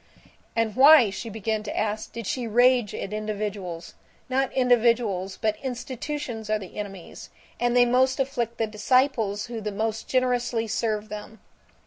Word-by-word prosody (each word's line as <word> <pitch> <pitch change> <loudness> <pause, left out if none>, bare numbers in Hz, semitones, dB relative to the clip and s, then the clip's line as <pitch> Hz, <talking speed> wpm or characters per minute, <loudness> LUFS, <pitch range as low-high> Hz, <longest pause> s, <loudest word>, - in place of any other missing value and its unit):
And 225 -2 0
why, 270 -5 +8
she 230 +3 -6
began 220 0 -2
to 215 - -6
ask, 215 0 -2
did 230 -2 -6
she 245 +3 -2
rage 245 -1 +3
at 195 - -5
individuals? 205 -5 -4 0.4
Not 265 +1 +1
individuals 230 -7 +2
but 215 -1 0
institutions 250 -2 -5
are 215 - +2
the 190 -4 -10
enemies, 195 -4 -8 0.3
and 240 0 +2
they 245 - +7
most 260 +2 +2
afflict 240 -4 -2
the 225 - +1
disciples 215 -1 +1
who 235 -2 -6
the 210 0 -3
most 220 +2 -3
generously 245 -3 +1
serve 215 -1 -2
them. 210 +1 -8
225 Hz, 150 wpm, -25 LUFS, 210-250 Hz, 0.4 s, why